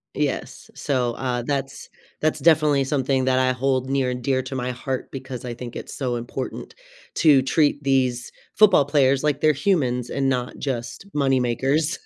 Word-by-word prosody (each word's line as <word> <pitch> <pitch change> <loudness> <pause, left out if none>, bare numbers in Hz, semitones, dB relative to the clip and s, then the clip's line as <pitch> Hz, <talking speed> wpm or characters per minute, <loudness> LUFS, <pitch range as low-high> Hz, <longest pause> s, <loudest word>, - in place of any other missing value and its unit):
Yes. - - -3
So, 125 -4 -1
uh, 125 -1 -2
that's, 135 -2 -3 0.3
that's 155 0 0
definitely 150 -2 +4
something 135 -1 0
that 130 0 +2
I 130 0 +3
hold 130 0 -1
near 135 -2 +1
and 125 -1 -4
dear 130 -1 +1
to 130 +1 -6
my 125 0 -2
heart 130 +1 -5
because 130 -2 -7
I 120 - -4
think 120 0 -8
it's - - -7
so 125 -3 -2
important 120 +2 -6 0.4
to 145 -5 +5
treat 145 +1 +1
these 130 -3 0 0.2
football 200 -9 +5
players 140 -1 +2
like 145 -2 +1
they're 155 -1 +4
humans 130 - 0
and 135 -1 -1
not 125 -2 -2
just 120 +3 -4
money 135 -3 +2
makers, 135 +7 0
135 Hz, 175 wpm, -23 LUFS, 125-145 Hz, 0.4 s, to